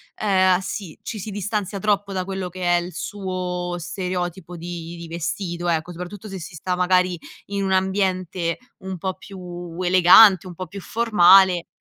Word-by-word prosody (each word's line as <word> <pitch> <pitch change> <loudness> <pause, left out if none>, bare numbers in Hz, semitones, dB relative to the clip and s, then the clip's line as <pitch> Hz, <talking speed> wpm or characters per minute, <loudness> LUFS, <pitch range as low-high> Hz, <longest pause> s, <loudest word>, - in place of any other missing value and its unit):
ehm, 185 -3 +3
sì 190 -3 -6
ci 215 - -5
si 210 - -6
distanzia 205 0 -3
troppo 200 0 0
da 185 -1 -2
quello 190 -1 -4
che 185 +1 -7
è - - 0
il 175 +1 -7
suo 180 -1 -4
stereotipo 180 0 -4
di 170 0 -7
di 170 0 -8
vestito 170 +1 -4
ecco 165 +1 -1
soprattutto 180 +4 -8
se 195 -2 -6
si 175 +1 -9
'sta 180 +3 -2
magari 180 0 +2 0.3
in 200 0 -2
un 190 - -1
ambiente 185 -3 0 0.2
un 190 -1 -6
po' 190 +2 -3
più 175 -3 -9
elegante, 185 +1 +7
un 180 - -9
po' 185 - -5
più 200 +4 -9
formale 190 -5 +5
185 Hz, 170 wpm, -22 LUFS, 175-195 Hz, 0.3 s, elegante